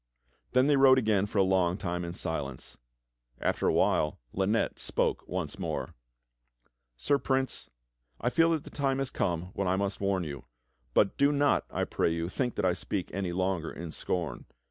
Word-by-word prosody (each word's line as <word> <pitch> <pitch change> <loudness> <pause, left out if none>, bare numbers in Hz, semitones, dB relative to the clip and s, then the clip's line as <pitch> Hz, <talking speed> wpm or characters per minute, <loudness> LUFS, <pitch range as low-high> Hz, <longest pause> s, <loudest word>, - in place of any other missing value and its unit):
Then 130 +1 +5
they 145 -1 +4
rode 135 -1 +7
again 105 -5 +2
for 105 - -5
a 100 - +6
long 95 -1 +2
time 90 -3 -3
in 85 0 -5
silence. 70 -7 -4 0.6
After - - 0
a - - +4
while 75 -1 +2 0.2
Lynette 100 +4 0
spoke - - -1
one - - -2
more: - - -3 1.0
"Sir 140 - +2
Prince, 130 -1 -1 0.5
I 120 - 0
feel 165 +6 +4
that 155 - -1
the - - -11
time 135 -2 0
has 135 -1 -2
come 85 +1 -1
when 100 - -1
I 90 - +2
must 100 0 -2
warn 100 -2 +1
you; 70 -4 -7 0.5
but 100 - +3
do 140 +1 +5
not, 145 0 +2
I - - -1
pray - - 0
you, 85 +1 -2
think 125 +4 -2
that - - 0
I 90 - +3
speak 95 +1 -3
any 95 -1 -2
longer 90 -2 -1
in 85 -1 -7
scorn. 90 +1 -3
95 Hz, 185 wpm, -29 LUFS, 85-130 Hz, 1.0 s, rode